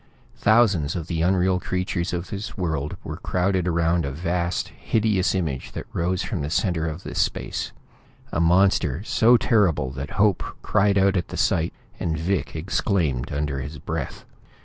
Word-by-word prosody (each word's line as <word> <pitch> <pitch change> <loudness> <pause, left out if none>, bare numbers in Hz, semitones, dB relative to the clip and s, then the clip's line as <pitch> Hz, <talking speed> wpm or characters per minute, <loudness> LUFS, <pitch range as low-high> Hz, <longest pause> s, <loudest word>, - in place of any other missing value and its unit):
Thousands 100 -9 +3
of 85 -3 -3
the 80 -1 -2
unreal 90 +1 +2
creatures 90 -1 -2
of 90 0 -4
this 100 +1 -5
world 80 -5 -2
were - - -5
crowded 90 0 0
around 85 0 +2
a 70 - -2
vast, 85 +4 -1
hideous 105 -4 +1
image 75 -9 -2
that - - -5
rose 90 +2 0
from 95 -9 -3
the 70 - -2
center 80 -1 0
of 80 +3 -5
the - - -6
space; - - -1 0.6
a - - -1
monster 90 -2 +3
so 115 +2 +5
terrible 85 - +2
that 70 +2 -6
Hope 100 -2 +3 0.2
cried 100 -1 +3
out 95 0 +4
at 85 - -1
the - - -6
sight, 80 0 +2 0.3
and 80 -1 -1
Vic 90 +2 -1
exclaimed 80 - 0
under 70 -1 -2
his 75 +4 -6
breath. - - -5
85 Hz, 165 wpm, -24 LUFS, 80-95 Hz, 0.6 s, so